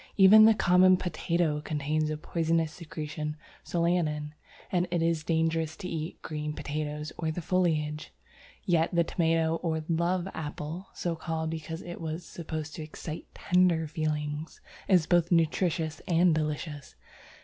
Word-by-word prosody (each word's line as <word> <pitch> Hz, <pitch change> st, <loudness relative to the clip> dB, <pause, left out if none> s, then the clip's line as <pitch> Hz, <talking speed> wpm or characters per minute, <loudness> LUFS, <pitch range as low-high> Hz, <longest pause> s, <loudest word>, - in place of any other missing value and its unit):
Even 210 Hz, +2 st, +9 dB
the 220 Hz, 0 st, +6 dB
common 185 Hz, 0 st, +5 dB
potato 170 Hz, -3 st, 0 dB
contains 155 Hz, +1 st, -1 dB
a 155 Hz, -, -2 dB
poisonous 165 Hz, 0 st, 0 dB
secretion 155 Hz, -2 st, -5 dB, 0.3 s
solanin, 165 Hz, -4 st, 0 dB, 0.4 s
and 180 Hz, -1 st, +1 dB
it 175 Hz, -, 0 dB
is 165 Hz, -2 st, +1 dB
dangerous 160 Hz, -1 st, 0 dB
to 180 Hz, -, -6 dB
eat 160 Hz, -2 st, -4 dB
green 150 Hz, -1 st, -4 dB
potatoes 150 Hz, +1 st, -4 dB
or 160 Hz, -, -1 dB
the 155 Hz, -, -3 dB
foliage. 155 Hz, -4 st, 0 dB, 0.5 s
Yet 170 Hz, -2 st, +3 dB
the 170 Hz, -, +5 dB
Tomato 165 Hz, -1 st, +1 dB
or 160 Hz, -2 st, -2 dB
Love 175 Hz, +2 st, 0 dB
Apple 155 Hz, +4 st, -5 dB
(so 170 Hz, -2 st, -2 dB
called 160 Hz, 0 st, -3 dB
because 160 Hz, +1 st, -5 dB
it 175 Hz, 0 st, -8 dB
was 160 Hz, +1 st, -4 dB
supposed 155 Hz, -2 st, -6 dB
to -, -, -5 dB
excite 155 Hz, +1 st, -7 dB
tender 180 Hz, -3 st, +3 dB
feelings) 150 Hz, 0 st, -3 dB, 0.3 s
is 180 Hz, -5 st, +4 dB
both 175 Hz, 0 st, +2 dB
nutritious 165 Hz, -1 st, +1 dB
and 175 Hz, 0 st, +4 dB
delicious. 150 Hz, -2 st, -3 dB
160 Hz, 140 wpm, -29 LUFS, 155-175 Hz, 0.5 s, Even